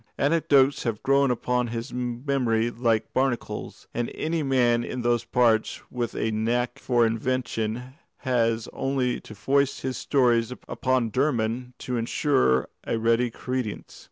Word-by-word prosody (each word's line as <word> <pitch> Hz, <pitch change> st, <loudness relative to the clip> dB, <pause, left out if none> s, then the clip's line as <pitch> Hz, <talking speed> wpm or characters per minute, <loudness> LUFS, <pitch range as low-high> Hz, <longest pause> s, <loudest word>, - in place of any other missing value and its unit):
Anecdotes 145 Hz, -2 st, +3 dB
have 115 Hz, -3 st, -3 dB
grown 140 Hz, 0 st, +3 dB
upon 125 Hz, 0 st, 0 dB
his 115 Hz, +3 st, -5 dB
memory 120 Hz, -2 st, 0 dB
like 115 Hz, -2 st, 0 dB
barnacles, 130 Hz, -2 st, -2 dB
and 120 Hz, 0 st, -2 dB
any 160 Hz, +1 st, -1 dB
man 125 Hz, -4 st, +2 dB
in 125 Hz, 0 st, -4 dB
those 120 Hz, -1 st, +1 dB
parts 115 Hz, -3 st, +2 dB
with 120 Hz, -2 st, -3 dB
a 110 Hz, -, 0 dB
knack 120 Hz, +4 st, -1 dB
of 120 Hz, -2 st, +4 dB
invention 115 Hz, +1 st, -1 dB, 0.3 s
has 115 Hz, -4 st, +1 dB
only 135 Hz, -2 st, -1 dB
to 110 Hz, -, -11 dB
foist 140 Hz, +4 st, +1 dB
his 130 Hz, -1 st, -3 dB
stories 120 Hz, -4 st, +2 dB, 0.2 s
upon 130 Hz, -3 st, 0 dB
Dermod 125 Hz, -2 st, 0 dB
to 125 Hz, -1 st, -3 dB
ensure 115 Hz, -, +2 dB, 0.2 s
a -, -, -1 dB
ready 115 Hz, +2 st, +2 dB
credence. 125 Hz, -2 st, -5 dB
125 Hz, 135 wpm, -26 LUFS, 115-130 Hz, 0.3 s, of